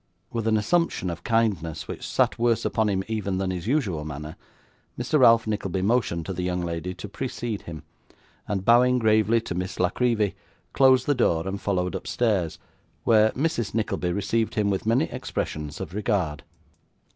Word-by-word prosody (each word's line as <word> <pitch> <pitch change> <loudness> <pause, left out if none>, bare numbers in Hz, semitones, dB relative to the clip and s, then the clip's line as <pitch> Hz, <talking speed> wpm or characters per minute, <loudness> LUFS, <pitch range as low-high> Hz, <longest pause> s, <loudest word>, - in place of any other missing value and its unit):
With 115 -1 -2
an 110 -1 +3
assumption 105 - 0
of 85 +1 -8
kindness 100 -9 0
which - - -6
sat - - +1
worse 115 -1 +2
upon 110 -2 +1
him 95 -1 0
even 100 -4 -2
than 95 0 -1
his 90 +1 -5
usual 110 - 0
manner, 75 +1 -7 0.6
Mr. 130 +5 +1
Ralph 115 -3 +6
Nickleby 95 -4 -2
motioned 100 -7 +1
to 95 - -4
the 90 - -4
young 90 0 -1
lady 85 +1 -4
to - - -7
precede 120 -1 -4
him, 80 -2 -9 0.6
and 95 -2 -2
bowing 125 +2 +5
gravely 110 0 +3
to 100 - -5
Miss 90 +1 -4
La 90 0 +2
Creevy, 115 -5 +1 0.4
closed 130 -2 +5
the 145 - +3
door 85 -9 +1
and 100 +1 -4
followed 90 -3 -1
upstairs, 95 -3 -1 0.5
where 110 -1 +5
Mrs. 135 -7 -1
Nickleby 105 -5 -1
received 110 +4 -1
him 105 -2 +1
with 95 +2 -2
many 115 +3 +3
expressions 75 -1 -4
of 90 -3 -6
regard. 95 -7 -1
105 Hz, 170 wpm, -25 LUFS, 90-115 Hz, 0.6 s, Ralph